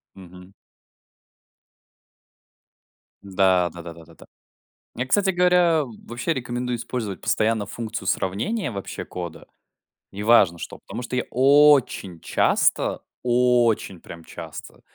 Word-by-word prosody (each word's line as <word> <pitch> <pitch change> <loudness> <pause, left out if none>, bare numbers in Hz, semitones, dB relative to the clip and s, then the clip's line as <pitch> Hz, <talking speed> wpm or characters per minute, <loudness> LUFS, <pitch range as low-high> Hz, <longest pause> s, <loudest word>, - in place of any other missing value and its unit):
Мгм. 90 0 -14 2.7
Да, 95 -2 +2
да 85 - -9
да 85 0 -9
да 85 0 -16
да. - - -16 0.7
Я, 125 - -2
кстати 195 +6 +2
говоря, 175 -3 +3 0.2
вообще 120 +8 -2
рекомендую 125 -2 -3
использовать 115 -4 -5
постоянно 110 -1 0
функцию 110 -2 -6
сравнения, 120 - -1
вообще, 100 -3 -6
кода. 85 -3 -8 0.6
Неважно 100 -4 +3
что, - - -8
потому - - -8
что 125 - -5
я 125 - 0
очень 135 - +4
часто, - - +1 0.2
очень, 120 -6 +2
прям, 85 0 -11
часто - - -10
115 Hz, 110 wpm, -23 LUFS, 95-125 Hz, 2.7 s, очень